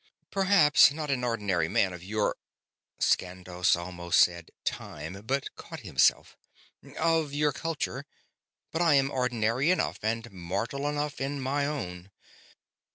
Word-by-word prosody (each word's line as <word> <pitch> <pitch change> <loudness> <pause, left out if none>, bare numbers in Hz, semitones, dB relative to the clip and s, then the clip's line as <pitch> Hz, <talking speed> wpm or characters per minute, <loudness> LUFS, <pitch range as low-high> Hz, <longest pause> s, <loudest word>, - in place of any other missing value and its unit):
"Perhaps 185 -8 +5
not 150 0 -3
an 125 -2 -1
ordinary 105 -8 0
man 95 +1 +1
of 90 -1 -9
your 105 +2 0 0.4
..." - - -47
Skandos 90 -1 +1
almost 85 0 -1
said 85 -2 +3
"time," 80 +6 -5
but 135 +2 -2
caught - - -9
himself - - +2 0.3
"... - - -33 0.2
of 160 -3 +1
your 150 0 +2
culture, 145 -3 -4 0.6
but 160 - -1
I 165 -4 +5
am 135 0 +3
ordinary 125 +2 +1
enough 185 - +1
and 115 +1 -2
mortal 100 +10 -3
enough 145 -1 -3
in 140 +1 -2
my 140 +2 0
own." 90 -11 -5
125 Hz, 140 wpm, -28 LUFS, 90-145 Hz, 0.6 s, Perhaps